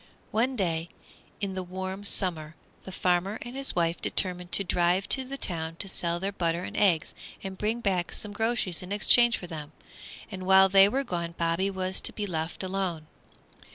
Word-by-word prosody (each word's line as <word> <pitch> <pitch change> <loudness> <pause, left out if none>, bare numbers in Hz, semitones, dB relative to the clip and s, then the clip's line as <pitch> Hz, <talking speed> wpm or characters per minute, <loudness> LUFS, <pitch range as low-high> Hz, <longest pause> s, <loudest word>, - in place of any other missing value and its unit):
One 250 +4 +1
day 170 -5 -1 0.5
in 200 -2 -2
the 190 - -3
warm 190 +2 -5
summer 165 -6 -1 0.3
the 190 - -7
farmer 185 +3 0
and 240 +2 -8
his 275 0 -1
wife 170 -1 0
determined 180 -2 -1
to 200 - +5
drive 180 +1 +2
to 265 - +4
the 275 +2 -5
town 165 -8 -1
to 195 - -5
sell 170 -2 +1
their 195 +2 -2
butter 170 -2 -1
and - - -7
eggs 180 -5 +2 0.3
and 190 -1 -5
bring 220 +4 -1
back 185 -5 0
some 210 -1 -5
groceries 225 -5 0
in 180 +1 -9
exchange 235 +3 +5
for - - -8
them, 155 -3 -8 0.6
and 185 -2 -6
while 190 0 +7
they 195 +1 +7
were 270 +5 0
gone 170 -7 -4
Bobby 170 +3 +1
was 185 -1 -1
to - - +1
be 210 - -3
left 165 -1 -3
alone. 185 -4 -2
185 Hz, 190 wpm, -28 LUFS, 170-200 Hz, 0.6 s, while